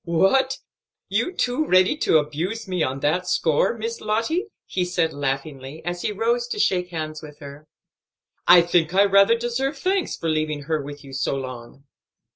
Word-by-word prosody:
"What, 195 +11 +2 0.5
you 355 - 0
too 250 -4 0
ready 185 +7 +4
to 160 - +3
abuse 165 +9 -3
me 180 -2 -2
on 135 -1 -1
that 180 +5 0
score, 160 +9 +1
Miss 230 +1 -4
Lottie?" 230 - -1 0.2
he 185 - -2
said 175 -2 0
laughingly, 140 +1 -4
as 175 0 -3
he - - -1
rose 235 +3 0
to 420 - -4
shake 180 - +1
hands 155 -2 -5
with 150 -2 -11
her. 145 +1 -11 0.8
"I 175 0 +8
think 170 0 +1
I 200 +1 +6
rather 200 +3 +5
deserve 250 +5 -2
thanks 375 +5 -1
for 165 - -4
leaving 155 -2 -1
her 155 +1 -1
with 145 +1 -9
you 135 -1 -12
so 135 +1 -1
long." 130 0 -8
175 Hz, 175 wpm, -23 LUFS, 150-225 Hz, 0.8 s, I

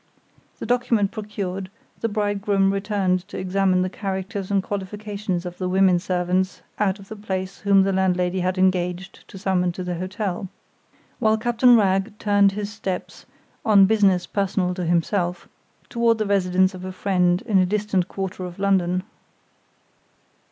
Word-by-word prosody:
The - - -6
document 235 -4 +1
procured, 195 -3 -5 0.3
the 230 - -1
bridegroom 205 -2 +1
returned 195 -2 0
to - - -8
examine 185 0 +1
the 185 - -2
characters 190 -1 -4
and 200 -1 +1
qualifications 200 -2 -4
of 175 0 -7
the 185 -1 -1
women 185 -1 +4
servants 185 +1 -1 0.2
out 200 -2 +1
of 195 -1 -14
the 220 - -8
place 190 -2 -4
whom 200 -2 +4
the 195 0 0
landlady 180 -1 +1
had 185 +1 -1
engaged 185 0 0
to - - -11
summon 185 -2 0
to 185 - -5
the 180 0 -3
hotel, 185 0 -3 0.7
while 220 -2 +3
Captain 240 +2 +4
Wragge 200 0 +1
turned 205 -2 +3
his 210 0 -4
steps, 190 -4 -5 0.4
"on 205 -3 +6
business 195 -4 +3
personal 190 -2 -1
to 180 -1 -4
himself," 175 +1 0 0.4
toward 235 -1 +2
the 215 - -1
residence 185 -1 +2
of 185 0 -9
a 185 - -5
friend 180 -2 +1
in 200 -3 +2
a 185 - +4
distant 200 -2 0
quarter 190 -1 -5
of 180 -1 -8
London. 185 -2 +1
190 Hz, 155 wpm, -23 LUFS, 185-205 Hz, 0.7 s, on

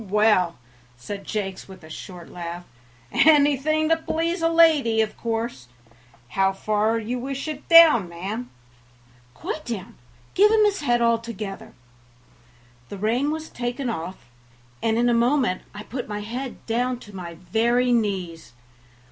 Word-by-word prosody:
"Well, 210 - -12
well," 210 -4 +3 0.4
said 200 +11 -7
Jakes, 195 -3 -4
with 190 -3 -13
a 155 - -13
short 175 +1 -9
laugh, 175 0 -7 0.5
"anything 300 +1 +4
to 325 - +4
please 330 +2 -2
a 330 - +3
lady, 315 -9 +4
of 220 - -2
course. 225 - -4 0.6
How 195 0 +1
far 215 +2 0
would 225 -2 -3
you 250 +1 -2
wish 270 +3 -4
it 300 -2 -6
down, 320 - +8
ma'am?" 200 +8 -5 0.9
"Quite 305 - -5
down, 205 -6 -6 0.4
give 415 +2 +5
him 430 -1 +4
his 405 -5 0
head 240 -4 +2
altogether." 230 -4 -2 1.2
The 200 - -7
rein 235 +8 0
was 315 +1 -4
taken 245 +1 -3
off, 180 -1 -6 0.6
and 225 0 +1
in 240 +1 +2
a 240 - +3
moment 240 -4 +2
I 205 +1 -8
put 245 +1 -6
my 210 0 -4
head 245 +5 -6
down 245 +2 0
to 205 -2 -13
my 170 -2 -7
very 235 +8 +1
knees. 190 - -2
230 Hz, 150 wpm, -24 LUFS, 195-275 Hz, 1.2 s, down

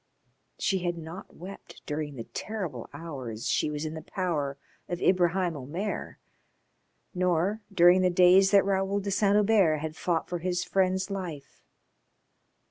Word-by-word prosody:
She 195 - 0
had 175 -1 -2
not 165 +4 -9
wept 190 +3 -11
during 150 -1 -4
the 115 - -5
terrible 205 - -5
hours 130 -9 -6
she - - +1
was 150 +1 -4
in 155 - -4
the 160 - -6
power 155 -9 -2 0.3
of 175 - -3
Ibraheim 180 -1 +2
Omair, 165 +10 -4 1.0
nor 180 +3 +1
during 180 0 +6
the 185 - +3
days 180 +2 +6
that 200 -1 +5
Raoul 195 0 +1
de 200 0 -3
Saint 200 0 +3
Hubert 205 -7 +4
had 155 +1 -5
fought 170 -1 -1
for 175 0 -3
his 180 +1 -1
friend's 190 0 0
life. 175 -8 -6
180 Hz, 145 wpm, -28 LUFS, 160-195 Hz, 1.0 s, during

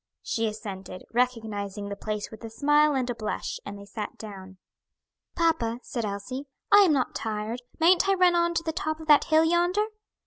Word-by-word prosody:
She 225 0 -1
assented, 195 -4 -7
recognizing 220 -5 -1
the 200 - -4
place 210 0 -4
with 220 +1 -11
a 225 - -6
smile 295 +4 +3
and 255 -2 0
a - - -1
blush, 215 -2 -4
and 205 0 -7
they 200 - -11
sat 210 +1 -6
down. 190 -3 -10 0.8
"Papa," 320 -9 +1
said 235 -3 -3
Elsie, 210 +8 -5 0.2
"I 410 - +9
am 345 - +3
not 265 -3 0
tired, 220 +2 -3 0.2
mayn't 360 +4 +5
I 390 - +4
run 365 -1 +5
on 340 0 +2
to 330 - 0
the 320 -1 -2
top 315 -1 -2
of 320 - -9
that 295 - +7
hill 315 +1 +4
yonder?" 350 +5 +2
240 Hz, 195 wpm, -27 LUFS, 210-320 Hz, 0.8 s, I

